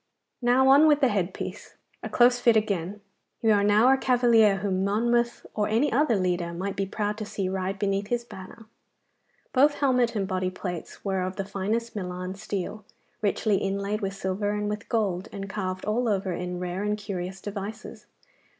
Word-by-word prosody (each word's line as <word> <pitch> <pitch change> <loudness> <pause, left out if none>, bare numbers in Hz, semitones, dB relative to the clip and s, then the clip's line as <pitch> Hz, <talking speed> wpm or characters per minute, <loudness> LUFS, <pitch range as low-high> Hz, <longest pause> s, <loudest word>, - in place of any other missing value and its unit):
Now 250 +2 +4
on 285 +3 +7
with 295 -1 +5
the 270 -3 +4
head 195 -4 0
piece. - - -7 0.3
A - - -5
close 245 0 +4
fit 235 -2 +4
again. 200 -2 -2 0.4
You 225 - +4
are 205 -1 +4
now 215 +6 +5
a - - +2
cavalier 240 -5 +4
whom 190 -1 -1
Monmouth 235 +4 +1
or 210 -1 0
any 230 +7 +2
other 265 -2 +3
leader 180 -2 -1
might 190 +3 -3
be 195 -1 -2
proud 210 +2 -2
to 215 - -4
see 195 -2 -3
ride 190 +1 -2
beneath 195 0 -1
his 240 +1 -1
banner.' 220 0 -11 0.9
Both 290 +3 +4
helmet 250 -4 +2
and 195 -2 -1
body 185 -1 -1
plates 180 -1 -7
were 190 -1 0
of 185 +1 -3
the 195 - -3
finest 210 +4 -2
Milan 180 -1 -4
steel, 205 +1 -5 0.4
richly 210 0 +1
inlaid 200 +2 -2
with 195 -1 -3
silver 190 +2 -2
and 210 0 -2
with 210 -1 -6
gold, 195 -5 0
and 195 -1 -6
carved 185 -2 -4
all 235 +3 0
over 195 -3 0
in 180 +1 -4
rare 180 +1 -3
and 210 0 -1
curious 190 -2 -5
devices. 205 +2 -7
205 Hz, 185 wpm, -26 LUFS, 190-230 Hz, 0.9 s, on